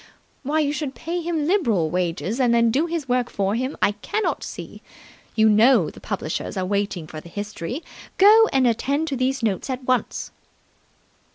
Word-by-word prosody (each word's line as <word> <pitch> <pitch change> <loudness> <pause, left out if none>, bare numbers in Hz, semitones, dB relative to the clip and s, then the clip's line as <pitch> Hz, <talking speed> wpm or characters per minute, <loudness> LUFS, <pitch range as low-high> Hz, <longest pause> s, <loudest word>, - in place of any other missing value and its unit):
Why 300 +3 0
you 290 -1 0
should 295 -3 -4
pay 345 +2 -3
him 325 -3 -1
liberal 230 - +1
wages 180 +6 -2
and 240 -2 +3
then 230 -1 +4
do 290 +8 +1
his 330 -5 -3
work 245 -1 +1
for 195 0 -1
him, 255 +4 -2
I - - +4
cannot 305 - -2
see. - - -8 0.5
You 220 0 +5
know 220 - +5
the - - -14
publishers 155 +5 -4
are 185 - -1
waiting 200 -3 -2
for 155 0 -9
the 170 - -13
History. 205 - -5 0.3
Go 435 +3 +7
and 265 -1 +3
attend 275 +6 0
to 275 - -2
these 255 0 -1
notes 215 +4 -1
at 260 0 -3
once." 255 -1 -1
250 Hz, 180 wpm, -23 LUFS, 205-290 Hz, 0.5 s, Go